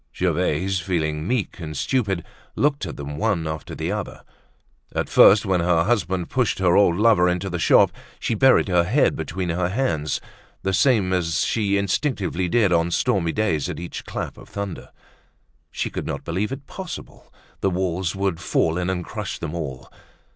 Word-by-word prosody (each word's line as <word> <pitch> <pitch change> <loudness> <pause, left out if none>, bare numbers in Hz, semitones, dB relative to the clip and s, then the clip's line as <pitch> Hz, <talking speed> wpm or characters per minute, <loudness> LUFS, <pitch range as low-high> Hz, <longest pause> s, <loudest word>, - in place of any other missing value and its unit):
Gervaise, 95 +5 0
feeling 80 -3 -2
meek 120 -5 -1
and 75 -3 -6
stupid, 100 - 0 0.3
looked 140 - +1
at 80 - -7
them 75 0 -6
one 100 -7 0
after 80 0 -5
the - - -3
other. - - -5 0.7
At - - -1
first, 105 +3 +7
when 95 -2 +2
her 85 -1 +3
husband 95 -5 0
pushed 125 -4 +1
her 90 -2 +3
old 90 -4 +4
lover 105 -5 +4
into 90 +1 -2
the 90 - -2
shop, - - +5 0.3
she - - -1
buried 130 +2 +4
her 90 -2 +3
head 115 +12 +2
between 85 +3 -3
her 85 +1 0
hands, 85 - -1 0.4
the 95 - 0
same 100 -3 +3
as 85 -4 +1
she 100 -3 +1
instinctively 100 - -1
did 105 -3 +3
on 85 0 +2
stormy 85 -1 +1
days 85 -9 0
at - - -5
each 85 0 -6
clap - - -5
of - - -14
thunder. 100 -3 -6 0.8
She - - -3
could - - -4
not - - -4
believe 95 +7 -2
it 135 +1 -6
possible; 190 +3 -9 0.3
the 95 - +1
walls 90 -1 -1
would 95 -4 -1
fall 80 0 +1
in 90 +1 -1
and 90 -2 -2
crush - - -5
them 80 -1 -5
all. 70 -7 -6
90 Hz, 175 wpm, -23 LUFS, 85-100 Hz, 0.8 s, first